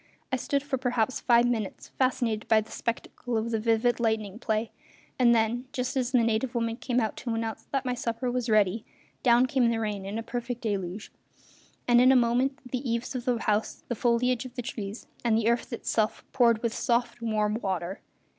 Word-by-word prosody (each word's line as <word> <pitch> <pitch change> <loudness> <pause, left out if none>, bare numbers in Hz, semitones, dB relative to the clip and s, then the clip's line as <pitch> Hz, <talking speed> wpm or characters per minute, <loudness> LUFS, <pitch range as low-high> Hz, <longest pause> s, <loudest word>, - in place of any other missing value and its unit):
I - - +2
stood 280 +2 -1
for 280 -3 -2
perhaps 245 -1 0
five 235 -1 +4
minutes 225 -5 -2
fascinated 240 -4 0
by 220 -1 +5
the 215 - -13
spectacle 235 0 -3
of 225 +1 -2
the 225 - +1
vivid 230 +2 +2
lightning 220 -2 -1
play; 220 -1 -1 0.5
and 240 -2 +6
then, 230 +3 +1
just 255 0 -2
as 255 -2 0
the 245 -3 +4
native 230 +2 0
woman 230 -1 -1
came 250 -1 0
out 220 -3 -1
to 235 -3 -3
announce 225 -1 -4
that 275 -2 -1
my 250 - 0
supper 245 0 -2
was 250 -1 -2
ready, 215 0 +3 0.4
down 240 0 +5
came 255 -2 +2
the 230 -1 0
rain 210 -3 -2
in 200 +3 -4
a 225 - -3
perfect 240 +1 -4
deluge; 200 -2 -3 0.8
and 240 0 +6
in 255 +1 +7
a - - +5
moment 250 +3 +2
the 255 - -1
eaves 240 -1 -2
of 250 -2 -4
the 245 -2 +2
house, 210 0 0
the 240 - -1
foliage 245 +2 +1
of 255 -1 -10
the 245 - -4
trees, 210 -1 -6 0.2
and 230 -2 +3
the 225 -1 +1
earth 235 +2 +1
itself 220 -2 -1
poured 235 -4 +3
with 230 -1 0
soft, 240 -1 0
warm 215 -2 0
water. 190 -1 -3
235 Hz, 200 wpm, -28 LUFS, 220-250 Hz, 0.8 s, in